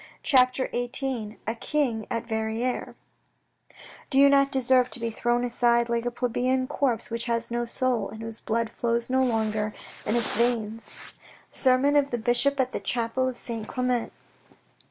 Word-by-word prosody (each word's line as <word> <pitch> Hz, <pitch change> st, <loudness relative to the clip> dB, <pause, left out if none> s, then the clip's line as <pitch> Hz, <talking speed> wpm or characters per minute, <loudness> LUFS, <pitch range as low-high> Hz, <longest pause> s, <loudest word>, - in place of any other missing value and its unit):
CHAPTER 255 Hz, -1 st, +4 dB
XVIII 245 Hz, -3 st, -2 dB
A 225 Hz, -, -1 dB
KING 235 Hz, -3 st, -1 dB
AT 230 Hz, -2 st, -2 dB
VERRIRES 220 Hz, +2 st, -2 dB, 1.1 s
Do 270 Hz, -, 0 dB
you 280 Hz, +1 st, +7 dB
not 275 Hz, 0 st, +4 dB
deserve 255 Hz, -1 st, +3 dB
to -, -, -5 dB
be 230 Hz, 0 st, -2 dB
thrown 240 Hz, +2 st, 0 dB
aside 235 Hz, -1 st, +2 dB
like 235 Hz, 0 st, 0 dB
a -, -, +2 dB
plebeian 250 Hz, +2 st, 0 dB
corpse 255 Hz, -5 st, -1 dB
which 230 Hz, 0 st, -3 dB
has 235 Hz, -1 st, -1 dB
no 240 Hz, 0 st, -1 dB
soul 245 Hz, -3 st, -1 dB
and 220 Hz, +2 st, -9 dB
whose 225 Hz, 0 st, -7 dB
blood 230 Hz, 0 st, -1 dB
flows 235 Hz, +1 st, -1 dB
no 260 Hz, 0 st, +3 dB
longer 215 Hz, -3 st, 0 dB, 0.3 s
in 215 Hz, -, +1 dB
its 235 Hz, -2 st, 0 dB
veins. 230 Hz, -1 st, -1 dB, 0.5 s
Sermon 265 Hz, +2 st, +4 dB
oj 285 Hz, -1 st, +3 dB
the 240 Hz, -, -1 dB
Bishop 245 Hz, +5 st, +2 dB
at 260 Hz, -1 st, +1 dB
the -, -, -3 dB
Chapel 235 Hz, +5 st, -1 dB
of 250 Hz, -, -7 dB
Saint 225 Hz, -3 st, -3 dB
Clement. 250 Hz, -2 st, -1 dB
240 Hz, 165 wpm, -26 LUFS, 230-255 Hz, 1.1 s, you